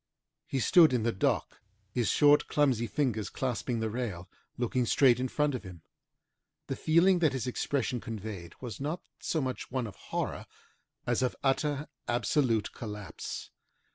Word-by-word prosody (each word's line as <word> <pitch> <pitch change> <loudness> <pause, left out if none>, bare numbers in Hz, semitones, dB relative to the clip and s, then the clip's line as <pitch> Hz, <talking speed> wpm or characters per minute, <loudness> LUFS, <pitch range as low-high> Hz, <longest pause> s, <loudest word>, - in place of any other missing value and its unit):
He 135 - -1
stood 160 +3 +6
in 120 -3 +1
the 115 - +2
dock, 95 - -1 0.3
his 120 -1 0
short, 145 0 +5
clumsy 130 -6 +2
fingers 115 -5 -1
clasping 125 -2 -2
the 110 - 0
rail, 105 -7 -4 0.3
looking 120 0 0
straight 125 -2 +5
in 130 - 0
front 150 +2 0
of 125 - -4
him. 90 -4 -11 0.8
The - - -3
feeling 175 +3 +4
that 160 -5 +3
his 130 -4 -2
expression 125 0 -1
conveyed 105 -6 -6
was 120 -1 -7
not 155 +5 -3 0.2
so 160 - -1
much 130 -1 -4
one 125 -1 -1
of 100 -5 -8
horror - - -4 0.6
as - - +1
of 125 - 0
utter, 145 +2 +1 0.2
absolute 120 -3 +1
collapse. 105 -4 -7
125 Hz, 155 wpm, -30 LUFS, 110-145 Hz, 0.8 s, stood